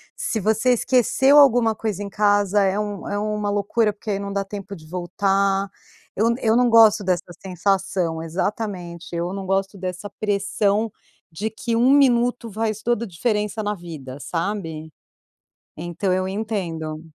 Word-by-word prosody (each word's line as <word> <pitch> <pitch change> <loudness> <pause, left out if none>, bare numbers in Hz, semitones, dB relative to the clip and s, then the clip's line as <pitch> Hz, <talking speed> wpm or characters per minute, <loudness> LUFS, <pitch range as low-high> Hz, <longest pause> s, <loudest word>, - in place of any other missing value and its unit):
Se 225 - -2
você 220 +4 +1
esqueceu 260 +3 +3
alguma 245 -5 +5
coisa 210 -3 -3
em 200 - -6
casa 205 0 +2
é 195 +1 +1
um 205 -2 -4
é 205 - -1
uma 210 -1 -2
loucura, 205 +2 +1
porque 210 +1 -6
aí 195 - -1
não 200 0 -5
dá 200 0 -2
tempo 200 -1 -7
de 155 -5 -11
voltar. 195 +3 0 0.5
Eu 230 +3 +2
eu 225 0 +3
não 245 0 +4
gosto 225 -2 +6
dessa 180 -1 -1
sensação 185 -3 -1
exatamente, 175 -1 -4
eu 170 +2 -2
não 195 -1 -5
gosto 195 +1 -1
dessa 185 +2 -5
pressão 205 +1 +1 0.4
de 200 +7 -3
que 230 +1 -3
1 245 +3 +4
minuto 245 -4 +3
faz 215 0 -2
toda 235 -1 0
a - - -5
diferença 210 +3 -1
na 210 0 -2
vida, 150 -7 -9
sabe? 165 -3 -4 0.9
Então 175 +2 -2
eu 185 0 0
entendo. 175 -7 -4
200 Hz, 155 wpm, -22 LUFS, 185-220 Hz, 0.9 s, gosto